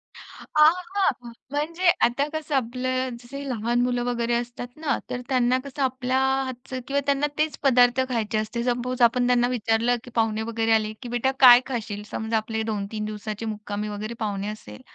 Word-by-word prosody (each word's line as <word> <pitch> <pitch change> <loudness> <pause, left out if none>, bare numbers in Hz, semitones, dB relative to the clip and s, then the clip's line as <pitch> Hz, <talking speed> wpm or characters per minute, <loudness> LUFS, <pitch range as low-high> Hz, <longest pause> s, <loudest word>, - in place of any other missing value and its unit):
अ, - - -12 0.4
हां, 305 +1 +8 0.2
हां. 250 -12 0 0.2
म्हणजे 330 +5 +1 0.2
आता 275 +5 0
कसं 310 -2 -3
आपलं 255 0 -1
जसं 275 +4 -8
लहान 240 +1 0
मुलं 245 -1 0
वगैरे 240 -1 -1
असतात 240 +1 -4
ना, 310 -3 0
तर 250 - -3
त्यांना 255 -1 +3
कसं 280 +1 -6
आपल्या 260 0 0 0.3
हातचं 260 0 -6
किंवा 280 +1 +1
त्यांना 280 +1 +2
तेच 305 0 0
पदार्थ 250 -2 +5
खायचे 220 -3 -1
असते. 220 +2 -2
सपोज 250 +1 -1
आपण 245 +1 +4
त्यांना 245 -1 +3
विचारलं, 235 0 +1
की 250 - -11
पाहुणे 220 -1 +1
वगैरे 225 0 0
आले 215 -1 +1
की 245 - -7
"बेटा 245 +2 +1
काय 250 -1 +9
खाशील?" 215 -5 -4
समजा, 220 0 -1
आपले 220 0 -2
2-3 210 0 -3
दिवसाची 215 +1 -5
मुक्कामी 210 0 -5
वगैरे 210 +2 -5
पाहुणे 200 -1 -2
असेल, 155 - -8
245 Hz, 175 wpm, -25 LUFS, 220-260 Hz, 0.4 s, काय